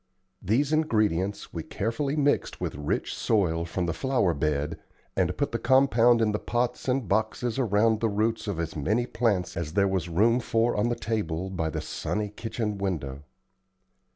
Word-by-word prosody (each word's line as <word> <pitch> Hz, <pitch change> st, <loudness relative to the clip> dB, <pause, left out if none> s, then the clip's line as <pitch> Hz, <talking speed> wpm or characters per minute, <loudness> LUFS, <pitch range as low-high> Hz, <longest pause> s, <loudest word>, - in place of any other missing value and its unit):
These 130 Hz, -, +1 dB
ingredients 105 Hz, -, 0 dB
we -, -, -3 dB
carefully 125 Hz, +7 st, -2 dB
mixed 145 Hz, -1 st, +1 dB
with -, -, -3 dB
rich 75 Hz, +1 st, -2 dB
soil 85 Hz, -6 st, +1 dB
from 85 Hz, +1 st, -2 dB
the 85 Hz, -, -1 dB
flower 125 Hz, -3 st, +1 dB
bed 75 Hz, +1 st, -1 dB, 0.4 s
and -, -, 0 dB
put -, -, 0 dB
the -, -, -2 dB
compound 120 Hz, -3 st, +4 dB
in 110 Hz, -, +2 dB
the 105 Hz, -, -1 dB
pots 120 Hz, +2 st, -2 dB
and 130 Hz, -3 st, 0 dB
boxes 110 Hz, +4 st, 0 dB
around 110 Hz, -2 st, +3 dB
the 115 Hz, -, +1 dB
roots 110 Hz, +2 st, 0 dB
of 100 Hz, -5 st, -2 dB
as 85 Hz, -1 st, -3 dB
many 105 Hz, +11 st, +1 dB
plants 105 Hz, -7 st, 0 dB
as 80 Hz, -2 st, -4 dB
there 100 Hz, +1 st, +3 dB
was 95 Hz, -3 st, -1 dB
room 110 Hz, +8 st, +3 dB
for 115 Hz, 0 st, +1 dB
on 105 Hz, +3 st, +1 dB
the 120 Hz, -, 0 dB
table 95 Hz, -6 st, -2 dB
by 80 Hz, -4 st, -1 dB
the -, -, -3 dB
sunny 105 Hz, -1 st, -3 dB
kitchen 105 Hz, -1 st, -4 dB
window. 75 Hz, -8 st, -3 dB
105 Hz, 175 wpm, -27 LUFS, 90-120 Hz, 0.4 s, compound